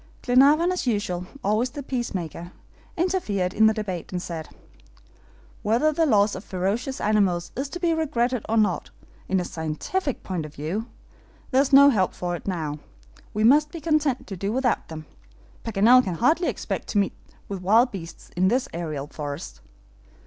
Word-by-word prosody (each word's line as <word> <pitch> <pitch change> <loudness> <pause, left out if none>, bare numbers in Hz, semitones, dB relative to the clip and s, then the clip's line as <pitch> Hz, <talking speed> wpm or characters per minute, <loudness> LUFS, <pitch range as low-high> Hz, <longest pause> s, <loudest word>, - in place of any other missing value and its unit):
Glenarvan, 285 +7 +5
as 365 -7 -2
usual, 190 -6 -1 0.2
always 215 +5 +1
the 285 +3 -7
peacemaker, 180 - -4 0.5
interfered 215 - 0
in 220 0 +5
the 220 - +4
debate, 190 -6 -4
and 180 - -2
said: 165 -3 -6 1.1
"Whether 235 +9 +2
the 325 +1 +2
loss 210 -4 +3
of 185 - -6
ferocious 205 +8 -2
animals 195 -5 +1
is 270 +2 -3
to 355 - -6
be 340 -2 +2
regretted 255 -7 0
or 225 - +2
not, 205 -5 +1 0.4
in 190 - +2
a 180 - -2
scientific 170 - -3
point 180 -4 -3
of 150 0 -10
view, 180 +11 -3 0.6
there 260 0 +5
is 280 - -1
no 280 +1 +8
help 190 -6 +1
for 175 -1 -3
it 175 - -9
now; 155 -5 -3 0.5
we 215 - -1
must 295 +6 +5
be 335 - -7
content 305 -5 +1
to 195 - -6
do 195 +3 -2
without 250 +1 0
them. 155 -1 -8 0.6
Paganel 230 +4 +5
can 180 -6 -3
hardly 315 - +2
expect - - -3
to - - -2
meet 200 -1 +2 0.3
with 195 -2 -5
wild 225 +7 +4
beasts 170 -4 -9
in 185 +2 +3
this 250 +6 +1
aerial 155 -4 -4
forest." 145 - -7
210 Hz, 170 wpm, -24 LUFS, 180-265 Hz, 1.1 s, no